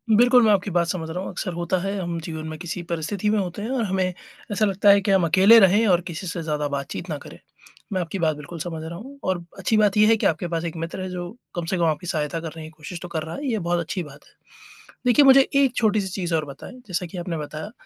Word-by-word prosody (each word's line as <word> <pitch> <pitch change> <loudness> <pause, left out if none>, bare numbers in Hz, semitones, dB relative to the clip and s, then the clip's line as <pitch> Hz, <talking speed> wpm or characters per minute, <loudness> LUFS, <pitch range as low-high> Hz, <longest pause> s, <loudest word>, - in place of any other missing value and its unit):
बिल्कुल 245 +2 +6
मैं 220 - +5
आपकी 200 0 +1
बात 170 -1 +2
समझ 165 -2 -3
रहा 170 +3 -4
हूँ। 195 - -5
अक्सर 180 - -4
होता 175 +2 -1
है, 195 +2 -2
हम 170 -2 -3
जीवन 160 -1 -5
में 155 0 -6
किसी 175 +1 -5
परिस्थिति 175 +5 -1
में 215 - +2
होते 185 +1 -4
हैं 220 - -4
और 260 -3 0
हमें 185 -1 0 0.4
ऐसा 210 +1 +2
लगता 200 0 +3
है 200 0 +7
कि 200 +1 0
हम 190 -3 +4
अकेले 190 +7 +7
रहें 205 +3 +5
और 180 -3 +4
किसी 175 +1 -6
से 170 0 -4
ज़्यादा 150 -2 -1
बातचीत 140 +5 -5
ना 155 - -2
करें। - - -12 0.5
मैं 185 - 0
आपकी 175 +3 -4
बात 160 -3 +1
बिल्कुल 150 +3 -9
समझ 160 -1 -5
रहा 165 +1 -6
हूँ। 275 +7 -11
और 185 -2 -1 0.2
अच्छी 205 +4 +1
बात 210 -1 +3
ये 210 - +7
है 225 - +6
कि - - -2
आपके 165 +2 +1
पास 165 -1 -2
एक 170 - -4
मित्र 165 +3 -5
है 185 - -4
जो, 180 +4 -6 0.2
कम 175 -1 -2
से 185 +3 -1
कम 170 - +1
आपकी 160 +2 -1
सहायता 155 0 -1
करने 165 -1 -7
की 155 - -8
कोशिश 160 +2 -9
तो 180 - -6
कर 165 -2 -3
रहा 160 +1 -6
है। 285 - -4
ये 220 - 0
बहुत 175 -1 0
अच्छी 175 +2 -3
बात 145 -2 -13
है। - - -24 0.7
देखिए, 265 +4 +6
मुझे 270 0 +8
एक 275 -2 +3
छोटी-सी 215 -3 +2
चीज़ 180 -2 -3
और 155 -1 0
बताएँ। 140 - -10
जैसा 180 -1 -2
कि 175 +2 -9
आपने 175 -1 -3
बताया 155 +5 -6
175 Hz, 270 wpm, -23 LUFS, 165-200 Hz, 0.7 s, मुझे